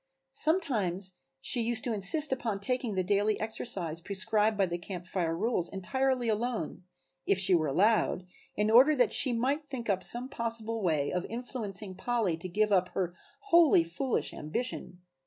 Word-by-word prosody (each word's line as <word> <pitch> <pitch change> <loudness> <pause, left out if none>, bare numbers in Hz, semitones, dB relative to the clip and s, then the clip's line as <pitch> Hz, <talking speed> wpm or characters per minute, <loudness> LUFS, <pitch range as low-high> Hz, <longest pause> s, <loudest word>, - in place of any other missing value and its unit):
Sometimes 215 - +1 0.3
she 250 -2 +1
used 230 -1 -1
to 240 - -1
insist 270 +10 +5
upon 225 -6 -3
taking 240 0 -2
the 185 - 0
daily 205 +3 0
exercise 195 -7 0
prescribed 210 +3 +1
by 195 - +2
the 175 -1 -5
Camp 180 0 -8
Fire 170 -3 -2
rules 200 -3 -1
entirely 255 +6 -2
alone, 220 -6 -3 0.4
if 195 - +2
she 190 0 +3
were 160 -3 +2
allowed, 185 +3 +1 0.3
in 210 +1 0
order 265 +7 +6
that 245 -5 +2
she 260 - +4
might 265 +6 -1
think 260 -7 -4
up 190 -1 -1
some 240 +5 +2
possible 230 -3 -4
way 155 -6 0
of 180 0 -2
influencing 215 -5 -4
Polly 225 -4 -1
to 170 +3 -7
give 210 +4 0
up 185 -2 +2
her 175 -2 -2 0.4
wholly 335 - +5
foolish 170 +10 -3
ambition. 180 +1 -5
215 Hz, 165 wpm, -29 LUFS, 185-245 Hz, 0.4 s, order